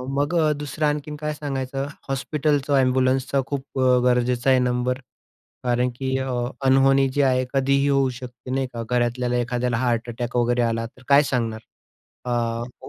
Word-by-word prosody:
मग 145 +5 0 0.2
दुसरं 150 +1 -2
आणखीन 150 0 -2
काय 150 0 -3
सांगायचं 135 -2 -3 0.2
हॉस्पिटलचा 140 0 +1
एम्ब्युलन्सचा 130 +1 +1
खूप 135 -1 -5 0.2
गरजेचा 125 +1 +2
आहे 130 -1 +5
नंबर 125 0 0 0.7
कारण 125 0 +1
की 130 0 -1
अ, 130 - -3 0.4
अनहोनी 135 +1 +4
जी 145 +2 0
आहे 130 -2 +2
कधीही 140 +1 +2
होऊ 135 -2 +3
शकते 125 -1 -9
नाही 130 0 0
का. 115 - -4
घरातल्याला 125 0 0
एखाद्याला 120 0 -1
हार्ट 120 -1 0
अटॅक 120 +1 -5
वगैरे 120 0 +2
आला 115 -1 0
तर 125 +2 -14
काय 140 +1 +6
सांगणार. 115 -5 -2 0.6
अ, 120 0 -3
130 Hz, 150 wpm, -23 LUFS, 120-135 Hz, 0.7 s, काय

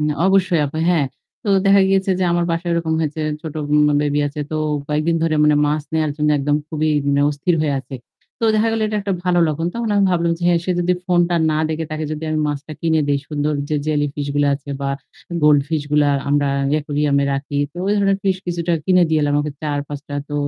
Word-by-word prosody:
উম 150 - +1 0.2
অবশ্যই 185 -4 +3
আপা, 155 +3 -5
হ্যাঁ। 160 -6 +2 0.4
তো - - -3 0.2
দেখা 195 0 +5
গিয়েছে 195 0 +2
যে 185 - +1
আমার 175 0 +1
বাসায় 170 +1 -2
এরকম 165 -1 0
হয়েছে 155 0 -2 0.2
ছোট 160 -2 -7 0.2
উম 150 - +5 0.2
বেবি 145 0 0
আছে। 145 +1 -5
তো 155 - -2 0.3
কয়েকদিন 155 +3 +1
ধরে 165 -1 +1
মানে 150 0 +4
মাছ 150 0 0
নেয়ার 155 -1 +1
জন্য 150 0 0
একদম 145 +1 +1
খুবই 155 0 -1 0.2
মানে 140 0 +2
অস্থির 150 +4 0
হয়ে 145 -2 0
আছে। 135 +1 -11 0.5
তো - - 0
দেখা 220 +1 +2
গেল 225 - -1
এটা 210 - -2
একটা 200 0 -2
ভালো 180 -1 +2
লক্ষণ। 160 +2 -2
তখন 235 -1 -2
আমি 200 -1 +3
ভাবলাম 170 -1 +1
যে - - -11
হ্যাঁ, 175 -1 +4
সে - - -2
যদি 180 +1 +2
ফোনটা 175 -1 +2 0.2
না 155 - 0
দেখে 160 +1 -2
তাকে 155 0 -3
যদি 155 +1 -6
আমি 155 - 0
মাছটা 145 +1 -5
কিনে 160 -2 +2
দেই 140 -1 +2
সুন্দর 150 0 -1 0.2
যে 150 - 0
জেলি 150 -1 +1
ফিশগুলা 145 0 0
আছে 140 0 -11
বা 140 - -1 0.5
গোল্ড 150 -1 +6
ফিশগুলার 145 -2 +1
আমরা 145 0 +2 0.2
ই - - +3
aquarium 145 -1 0
এ - - +1
রাখি। 140 +1 -3
তো - - -20
ওই 205 - +2
ধরনের 195 -1 +2
ফিশ 190 -1 +2
কিছুটা 170 0 -1
কিনে 185 +1 +4
দিয়ে 160 -1 +2
এলাম 145 0 +1
ওকে 150 0 -3
৪-৫ 145 -1 -4
টা। 145 - -5
তো 145 - -5
155 Hz, 225 wpm, -19 LUFS, 145-175 Hz, 0.5 s, গোল্ড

